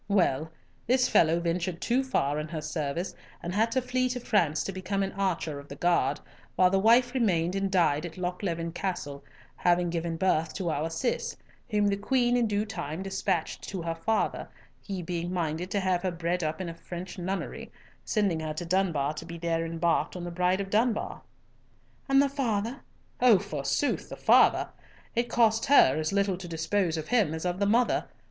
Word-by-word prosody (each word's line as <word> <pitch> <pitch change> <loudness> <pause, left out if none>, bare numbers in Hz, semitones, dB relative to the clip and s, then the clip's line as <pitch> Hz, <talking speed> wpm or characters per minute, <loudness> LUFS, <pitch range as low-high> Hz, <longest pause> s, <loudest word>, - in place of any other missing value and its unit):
Well, 160 -6 +1 0.4
this 255 +1 +3
fellow 165 +1 +4
ventured 170 +1 -2
too 250 +6 +1
far 150 - 0
in 150 - -4
her 160 0 -4
service, 155 +2 -3 0.3
and 175 - -3
had 220 +3 +2
to 260 - +1
flee 255 0 0
to 250 0 -3
France 175 -10 +1
to - - -3
become 195 +1 -2
an 195 - -2
archer 175 -6 -2
of 140 - -12
the 140 - -8
guard, 145 -4 +1 0.4
while 180 +4 +4
the 195 - +3
wife 240 +4 +4
remained 180 -9 +1
and 195 0 0
died 170 -5 +2
at 165 - -12
Lochleven 175 -2 -3
Castle, 165 -6 -4 0.3
having 175 -1 +2
given 165 -1 -2
birth 165 -3 +1
to 175 -4 -1
our 155 +2 -1
Cis, 165 +10 -2 0.3
whom 210 -2 +2
the 200 -1 +2
Queen 245 +3 +2
in 240 -2 +2
due 210 0 0
time 175 -4 -5
despatched 190 -3 -2
to 185 -4 -4
her 165 0 -1
father, 190 +7 -1 0.3
he 190 -3 -5
being 175 +1 -3
minded 170 0 -2
to 200 - 0
have 185 -2 +1
her 185 - 0
bred 175 +1 -2
up 155 0 -2
in 185 - -3
a 165 - -5
French 180 +2 -8
nunnery, 190 +2 -4 0.3
sending 200 -7 +1
her 155 -1 -4
to 175 - -4
Dunbar 165 -6 +1
to 155 +1 -7
be 170 0 -7
there 165 0 -1
embarked 165 +2 0
in 180 - -5
the 175 - -5
Bride 180 +2 +1
of 195 0 -6
Dunbar." 220 +1 0 0.9
"And 270 0 +5
the 280 - +5
father?" 245 -3 -2 0.4
"Oh, 245 -5 +7
forsooth, 175 - -1
the - - -6
father! - - +5 0.5
It 240 +1 0
cost 225 0 +3
her 265 - +6
as 155 0 -1
little 195 -2 +1
to 180 -1 -8
dispose 165 +1 0
of 155 -1 -5
him 210 -10 +2
as 160 - -5
of 180 +1 -1
the 200 - +2
mother. 235 +4 +2
180 Hz, 195 wpm, -28 LUFS, 165-205 Hz, 0.9 s, Oh